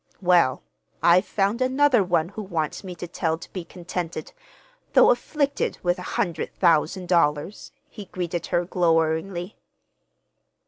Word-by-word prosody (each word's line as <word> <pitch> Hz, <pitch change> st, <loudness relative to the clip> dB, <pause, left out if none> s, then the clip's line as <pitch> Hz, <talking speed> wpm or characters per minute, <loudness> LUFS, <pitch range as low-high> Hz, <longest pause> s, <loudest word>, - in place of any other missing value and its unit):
"Well, 175 Hz, -8 st, +3 dB, 0.4 s
I've 180 Hz, +3 st, +5 dB
found 205 Hz, +4 st, 0 dB
another 260 Hz, -3 st, +3 dB
one 175 Hz, -2 st, 0 dB
who 215 Hz, -, -7 dB
wants 170 Hz, -6 st, -3 dB
me 185 Hz, -2 st, -7 dB
to 175 Hz, -, -7 dB
tell 165 Hz, -1 st, -1 dB
how -, -, -2 dB
to 165 Hz, -, -13 dB
be 185 Hz, -, -4 dB
contented, 175 Hz, -, -6 dB, 0.6 s
though -, -, +7 dB
afflicted 280 Hz, +3 st, -1 dB
with 175 Hz, +1 st, +1 dB
a 180 Hz, -, -6 dB
hundred 175 Hz, -5 st, -1 dB
thousand 175 Hz, +1 st, +2 dB
dollars," 165 Hz, +1 st, 0 dB, 0.2 s
he 210 Hz, -3 st, -10 dB
greeted 175 Hz, -2 st, -4 dB
her 175 Hz, -1 st, 0 dB
gloweringly. 170 Hz, +1 st, 0 dB
180 Hz, 140 wpm, -24 LUFS, 170-195 Hz, 0.6 s, though